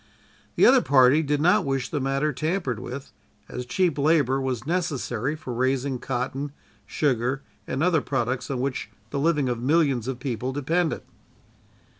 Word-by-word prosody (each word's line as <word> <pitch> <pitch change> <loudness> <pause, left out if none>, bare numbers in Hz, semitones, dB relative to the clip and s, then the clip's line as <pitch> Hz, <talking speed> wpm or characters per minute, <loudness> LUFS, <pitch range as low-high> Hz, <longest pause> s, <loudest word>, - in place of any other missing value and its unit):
The - - +5
other 260 0 +7
party 135 - +5
did 145 -1 0
not 180 +6 +4
wish 135 -3 -1
the 150 - -2
matter 135 +3 0
tampered 155 - -1
with, 130 +3 -7 0.4
as 125 0 -6
cheap 170 0 +1
labor 140 -3 +3
was 130 -3 -2
necessary 150 -6 -1
for 140 -5 -6
raising 130 +1 0
cotton, 135 +3 -3 0.3
sugar 130 -1 0 0.2
and 135 +4 -1
other 170 -4 +3
products 130 -2 -2
on 130 -3 -2
which 130 -5 -3 0.2
the 140 - -1
living 150 -2 +2
of 120 -1 -2
millions 135 -4 +2
of 130 -2 -2
people 125 0 -3
depended. 160 +4 0
135 Hz, 155 wpm, -25 LUFS, 125-155 Hz, 0.4 s, other